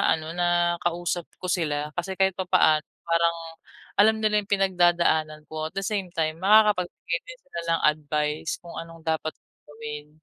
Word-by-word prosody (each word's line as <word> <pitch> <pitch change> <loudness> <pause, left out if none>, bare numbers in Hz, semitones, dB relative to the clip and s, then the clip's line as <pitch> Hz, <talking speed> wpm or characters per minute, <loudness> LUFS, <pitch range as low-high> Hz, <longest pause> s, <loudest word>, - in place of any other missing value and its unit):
ano, 155 - -8
na 175 0 0 0.3
kausap 175 0 -1 0.2
ko 185 - -4
sila 150 -4 -1
kasi 190 +2 -3
kahit 190 0 +4
papaano 175 -5 +3 0.2
parang 170 0 +2 0.6
alam 220 +2 +6
nila 210 -1 +3
yung 200 - -15
pinagdadaanan 175 -5 +2
ko 155 0 -3
at - - -33
the 195 - -1
same 195 -2 -2
time, 160 0 -1
makakapagbigay 190 -4 +3
din 255 0 -10
sila 220 -11 -6 0.2
ng - - -3
advice 150 0 0
kung 170 - -10
anong 165 0 -10
dapat 160 0 -1
kong - - -48
gawin. 150 0 -7
170 Hz, 165 wpm, -25 LUFS, 155-190 Hz, 0.6 s, alam